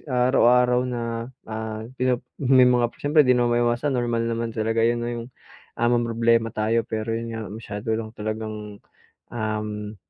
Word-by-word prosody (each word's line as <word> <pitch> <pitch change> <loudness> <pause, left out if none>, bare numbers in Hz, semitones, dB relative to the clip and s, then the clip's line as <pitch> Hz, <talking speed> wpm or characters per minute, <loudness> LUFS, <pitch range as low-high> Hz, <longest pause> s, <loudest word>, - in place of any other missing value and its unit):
araw-araw 125 -1 +4
na, 120 -1 -3 0.4
ah, 110 0 -5 0.2
pino 125 -1 +1 0.2
may 130 -2 +6
mga 125 -1 +3 0.2
siyempre 150 +2 +5
'di 125 -3 +4
naman 120 0 +2
maiwasan, 120 +4 +1
normal 120 -2 0
naman 115 0 -2
talaga 115 0 -1
'yon 115 +1 +3
'no 120 0 -3
'yong, 115 -1 -5 0.5
ah, 120 - +2
mamroblema 115 -1 +2
tayo. 110 +1 +1
Pero 110 +1 -2
'yon 115 +1 -3
nga, 110 -3 -6
masyado 110 0 -5
lang 110 0 -4
talagang, 110 -1 -5 0.5
um, 105 -2 -4
115 Hz, 155 wpm, -24 LUFS, 110-120 Hz, 0.5 s, may